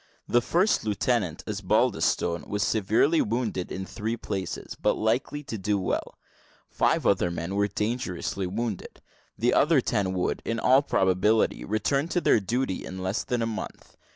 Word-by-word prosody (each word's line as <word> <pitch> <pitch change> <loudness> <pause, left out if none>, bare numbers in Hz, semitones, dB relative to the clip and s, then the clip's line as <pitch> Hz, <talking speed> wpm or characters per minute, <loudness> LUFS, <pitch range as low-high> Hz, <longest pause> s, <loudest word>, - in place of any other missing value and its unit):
The 120 - +3
first 180 - +2
lieutenant, 105 -4 0
Osbaldistone, 85 0 0
was 105 -1 -1
severely 110 - +2
wounded 110 -5 -2
in 95 - -4
three 110 +3 -4
places, 95 -5 -5
but - - 0
likely 125 +6 -1
to 115 -6 -6
do 100 +2 0
well; 95 - -3 0.5
five - - +1
other 90 - +3
men 85 +2 -4
were 100 0 +2
dangerously 100 -3 -2
wounded; 105 +1 -4 0.4
the 120 +3 +2
other 150 -1 +4
ten 100 -6 0
would, 90 - -1
in 115 0 -2
all 130 +4 +5
probability, 95 -3 +2
return 135 +8 0
to 175 - 0
their 140 - +4
duty 110 0 -2
in 95 0 -6
less 95 +4 -1
than 120 -2 -1
a - - +1
month. 115 -1 -6
110 Hz, 155 wpm, -26 LUFS, 95-120 Hz, 0.5 s, all